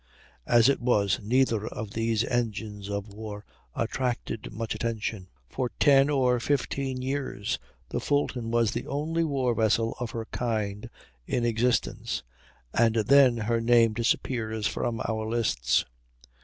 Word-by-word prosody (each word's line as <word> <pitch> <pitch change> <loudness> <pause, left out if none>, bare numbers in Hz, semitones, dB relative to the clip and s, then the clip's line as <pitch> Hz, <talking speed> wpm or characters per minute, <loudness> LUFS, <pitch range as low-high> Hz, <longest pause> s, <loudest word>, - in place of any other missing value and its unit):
As 120 0 +5
it 140 - +2
was, 100 -6 +2
neither 115 -1 +1
of 105 -2 -6
these 115 0 0
engines 110 -4 -3
of 100 0 -4
war 105 -1 -7 0.3
attracted 120 -3 -2
much 115 +1 -3
attention. 110 -3 -3 0.2
For 125 - -2
ten 140 0 +6
or 130 -4 +2
fifteen 135 0 -1
years 135 -6 -2 0.3
the - - -2
Fulton 130 -5 -1
was 115 -2 +2
the - - -4
only 155 +4 -1
war 135 -6 +1
vessel 115 0 +1
of 120 -2 -3
her 115 -1 -5
kind 110 -2 -2 0.4
in 120 -1 0
existence, 120 +1 0 0.5
and 115 -1 +3
then 125 +2 +5
her 115 +1 +1
name 115 -1 +4
disappears 110 -1 -1
from 115 +1 -1
our 110 -1 -2
lists. 115 - +1
115 Hz, 135 wpm, -27 LUFS, 110-125 Hz, 0.5 s, ten